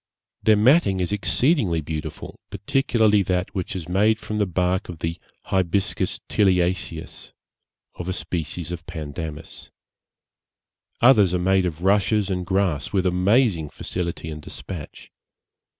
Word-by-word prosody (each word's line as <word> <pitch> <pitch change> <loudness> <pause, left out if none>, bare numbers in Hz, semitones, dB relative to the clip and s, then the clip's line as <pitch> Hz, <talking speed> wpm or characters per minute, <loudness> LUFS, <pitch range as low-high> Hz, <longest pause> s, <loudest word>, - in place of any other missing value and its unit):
Their 110 - +5
matting 110 - +4
is 90 +1 -1
exceedingly 105 - +2
beautiful, 80 0 -6
particularly 110 0 +2
that 90 -1 -1
which 95 -1 -4
is 90 -4 -5
made 105 +5 +3
from 110 -1 -4
the 105 - +2
bark 90 +2 0
of 85 - -6
the 80 +1 -4 0.2
Hibiscus 95 +1 0
tiliaceus, 90 -4 0
and - - -24 0.7
of 90 - -5
a - - -1
species 85 -1 -4
of 85 -1 -7
Pandanus. 80 -1 -7 1.3
Others 105 -8 +6
are - - 0
made 95 +1 +2
of 85 0 -6
rushes 100 +1 +2
and 90 -2 -2
grass 95 -7 0
with 95 -2 +1
amazing 90 - +2
facility 85 -2 -4
and 75 0 -7
dispatch. 75 +3 -9
90 Hz, 135 wpm, -23 LUFS, 85-100 Hz, 1.3 s, Others